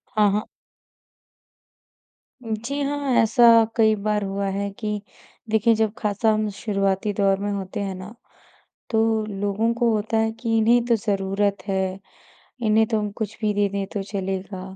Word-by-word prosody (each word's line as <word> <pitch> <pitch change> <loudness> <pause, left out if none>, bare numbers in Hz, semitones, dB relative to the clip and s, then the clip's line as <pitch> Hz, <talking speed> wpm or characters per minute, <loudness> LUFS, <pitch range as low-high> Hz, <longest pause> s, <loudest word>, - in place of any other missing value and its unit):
हाँ, 210 -1 +4
हाँ। 210 +1 -1 2.0
जी 230 +5 -3
हाँ, 285 -1 -1
ऐसा 225 +2 +3 0.3
कई 220 -2 +4
बार 210 0 -1
हुआ 195 0 -2
है 200 0 -2
कि 210 -2 -3 0.5
देखिए, 220 +1 +3
जब 220 -1 0
खासा 210 +1 +1
हम 215 0 0
शुरुआती 195 -1 0
दौर 195 -1 +2
में 205 +1 -2
होते 195 -1 -4
हैं 195 -1 -4
ना, 185 +4 -9 0.8
तो 220 -1 +1
लोगों 205 +2 -1
को 235 0 +1
होता 215 +2 -1
है 220 0 +1
कि, 230 0 -1
"इन्हें 235 +2 +4
तो 240 -1 +3
ज़रूरत 200 -2 -1
है। 190 -1 -1 0.7
इन्हें 220 +1 +4
तो 220 - +1
हम 210 -1 -2
कुछ 220 -1 -4
भी 215 -2 +1
दे 205 0 +2
दें, 200 0 -3
तो 200 0 -4
चलेगा।" 190 -1 -4
210 Hz, 160 wpm, -23 LUFS, 200-220 Hz, 2.0 s, हाँ